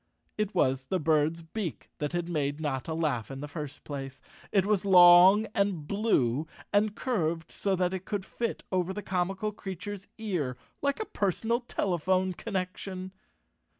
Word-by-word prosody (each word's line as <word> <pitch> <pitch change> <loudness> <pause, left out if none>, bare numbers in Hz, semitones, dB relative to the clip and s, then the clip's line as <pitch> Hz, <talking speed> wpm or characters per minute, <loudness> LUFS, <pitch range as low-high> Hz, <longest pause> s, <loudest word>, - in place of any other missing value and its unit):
It 210 -2 -2
was 135 -5 +2
the 185 +6 -1
bird's 160 +1 +2
beak 175 +1 -5
that 150 -1 -1
had 175 -1 -2
made 145 -3 -1
Notta 145 0 -2
laugh 145 -9 -1
in 135 0 -6
the 145 - -5
first 145 -1 -7
place. 135 -2 -6 0.3
It 195 -2 +3
was 205 -2 +2
long 185 +2 +8
and 200 -6 0
blue, 160 - +1 0.3
and 205 +1 +3
curved 170 -11 -1
so 195 -1 0
that 180 0 0
it 190 -1 -4
could 205 -3 -3
fit 235 -1 -3
over 185 0 0
the 210 +1 -5
comical 190 +3 -1
creature's 195 -1 -7
ear 175 - -2 0.2
like 280 0 0
a 435 - -2
personal 225 - 0
telephone 185 -5 0
connection. 185 -1 -4
185 Hz, 155 wpm, -29 LUFS, 155-200 Hz, 0.3 s, long